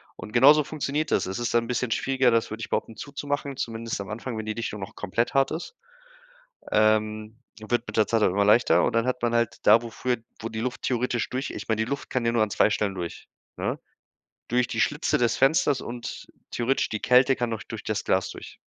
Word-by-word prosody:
Und 105 - -9
genauso 145 +5 +7
funktioniert 150 +1 -2
das. - - +2
Es 95 +4 -4
ist 120 - -2
dann 115 0 +3
bisschen 125 -1 -1
schwieriger, 130 +1 +2
das 115 -1 +1
würde 110 +1 -6
ich 110 - -5
behaupten, 110 - -2
zuzumachen, 140 -1 -4
zumindest 115 -1 -4
am 100 - -8
Anfang, 115 +1 -5
wenn 110 - -4
die 110 - -2
Dichtung 110 -3 -4
noch 95 - -8
komplett 115 +6 -1
hart 135 0 +3
ist. 165 - -5 1.0
Ähm, 110 +1 +1 0.2
wird 120 +2 -1
mit - - -6
der 110 - +5
Zeit 115 -2 +1
immer 100 +3 +3
leichter, 115 +4 +5
und - - +1
dann 115 +2 +1
hat 125 -1 -1
man 120 0 +1
halt 115 -2 0
da, 115 - +7
wo 120 - -7
früher 120 +1 -1 0.2
wo 115 - -4
die 110 - -5
Luft 125 +1 -3
theoretisch 125 -2 -1
durch 130 +2 -3
ich - - -7
meine, 110 0 +1
die 110 - -6
Luft 140 - -4
kann 125 -2 -1
ja 115 - +3
nur 115 -2 +3
an 105 - -1
2 - - +4
Stellen 105 -2 -1
durch, 85 -2 -6 0.3
ne? - - -2 0.7
Durch 125 0 +2
die - - -1
Schlitze - - +1
des 120 -2 +1
Fensters 135 -1 +3
und 120 0 -7 0.2
theoretisch 125 +3 0
die 110 - -3
Kälte 125 +1 +5
kann 120 -1 -1
noch 110 - -4
durch 115 -3 -8
das 110 -1 -2
Glas 95 0 +1
durch. - - -10
115 Hz, 230 wpm, -26 LUFS, 110-125 Hz, 1.0 s, genauso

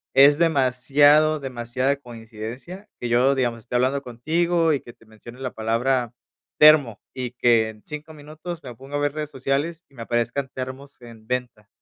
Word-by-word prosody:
es 140 +2 +7
demasiado 145 0 +3
demasiada 130 +1 -2
coincidencia 120 - -9
que 120 - -4
yo, 125 +3 +4
digamos, 120 -3 -1
estoy 125 +1 -2
hablando 135 +3 0
contigo 165 +7 0
y 140 - 0
que 120 - -13
te 115 -2 -24
mencione 115 +3 -13
la 130 -1 -4
palabra 120 +2 0 0.5
termo 150 -8 +6
y 125 -2 -4
que 115 -2 +3
en 110 -1 -13
5 150 +1 -8
minutos 155 +3 -9
me 125 -4 -9
pongo 135 +4 -9
a 145 - 0
ver 145 -1 0
redes 150 -1 -5
sociales 140 +6 -2
y 140 - -24
me 115 - -7
aparezcan 120 +4 -1
termos 130 +1 -8
en 115 -2 -14
venta. 125 -3 -4
130 Hz, 175 wpm, -23 LUFS, 120-145 Hz, 0.5 s, es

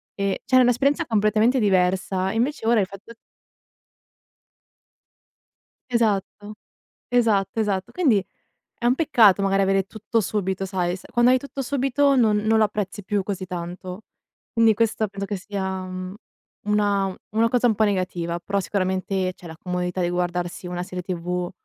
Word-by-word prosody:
ehm, 200 -1 0
cioè 270 - -11
era 255 - +7
un'esperienza 275 +6 +2
completamente 220 +3 +2
diversa. 190 -1 +1
Invece 235 +1 -1
ora 230 -1 +4
il - - +1
fatto 200 +4 -12 2.8
Esatto, 210 -2 -1 0.6
esatto, 225 -5 +2
esatto 200 -4 -1
quindi 250 - +2 0.5
è 240 - -1
un 245 - +4
peccato 230 - +4
magari 195 0 +2
avere 195 0 +2
tutto 220 +3 -2
subito 190 -2 -2
sai, 180 -2 -1
s 185 - -9
quando 240 +1 +4
hai 255 - +4
tutto 275 +1 -7
subito 275 +1 +1
non 225 -5 +3
non 215 +1 +2
lo 220 - +5
apprezzi 205 -1 -3
più 205 0 0
così 195 -1 -4
tanto. 180 +2 -6 0.5
Quindi 225 -1 +4
questo 220 0 +1
penso 200 0 -5
che 205 - -3
sia, 190 -1 -4
uhm, 185 0 -6 0.5
una 205 -2 +1 0.2
una 225 +2 +2
cosa 245 +1 +2
un 225 - +3
po' 215 - +2
negativa. 180 -4 -1
Però 200 +3 -2
sicuramente 185 -1 -1
cioè 180 - -14
la 160 - -9
comodità 180 +1 -3
di 175 - 0
guardarsi 175 0 -3
una 175 0 -4
serie 180 -1 -6
tv, 180 0 -3
200 Hz, 155 wpm, -23 LUFS, 185-225 Hz, 2.8 s, era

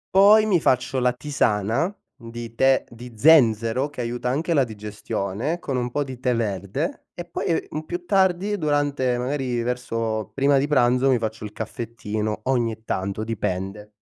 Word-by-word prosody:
Poi 210 +3 +7
mi 185 -7 +2
faccio 130 +1 +1
la 125 0 +3
tisana 125 - 0 0.2
di 115 -2 -8
tè 135 +2 +3
di 120 +1 -11
zenzero 125 -2 +4
che 145 -3 -6
aiuta 120 +1 -2
anche 160 +6 0
la 140 -4 +4
digestione, 105 - -4
con 140 -6 -4
un 125 -1 -1
po' 145 +4 -1
di 130 -3 -8
tè 125 -1 +1
verde, 105 - -3
e 175 - -6
poi, - - -5
e 165 - 0
mhmm, 155 - -3
più 175 +2 -6
tardi 190 +1 +2
durante 145 -5 +1
magari 125 -2 -1
verso 115 -3 -2
prima 140 0 +3
di 140 - 0
pranzo, 125 -2 +3
mi 130 - +4
faccio 110 -1 -4
il 105 - -7
caffettino 110 -1 -4
ogni 115 -4 0
tanto, 100 +2 -2
dipende. 105 -1 -3
125 Hz, 165 wpm, -23 LUFS, 110-145 Hz, 0.2 s, Poi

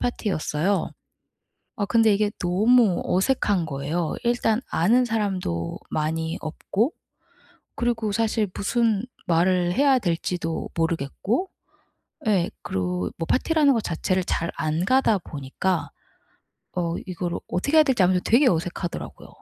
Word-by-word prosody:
파티였어요. 195 -5 -1 0.9
아 205 - 0
근데 225 0 +4
이게 205 0 +1
너무 205 +2 +3
어색한 195 -2 +1
거예요. 155 +3 -2
일단 235 -1 +1
아는 230 +10 +3
사람도 190 - -2
많이 160 +1 -1
없고 200 - -1 0.8
그리고 230 -3 -1
사실 220 0 +1
무슨 220 0 +1 0.2
말을 175 +1 +2
해야 275 +2 +4
될지도 170 -3 -2
모르겠고 170 - -1 0.8
예 185 -5 +2
그리고 90 -1 -2
뭐 165 - -3
파티라는 300 +1 +3
거 230 - +1
자체를 185 0 -1
잘 170 -1 -1
안 155 +3 -1
가다 255 -2 +3
보니까 165 +3 -3 0.8
어 170 -2 -1
이거를 175 -1 -3
어떻게 280 - 0
해야 310 - +7
될지 260 -8 +2
아무래도 180 0 +2
되게 255 +5 +6
어색하더라고요. 175 +1 -4
185 Hz, 280 characters per minute, -24 LUFS, 165-225 Hz, 0.9 s, 해야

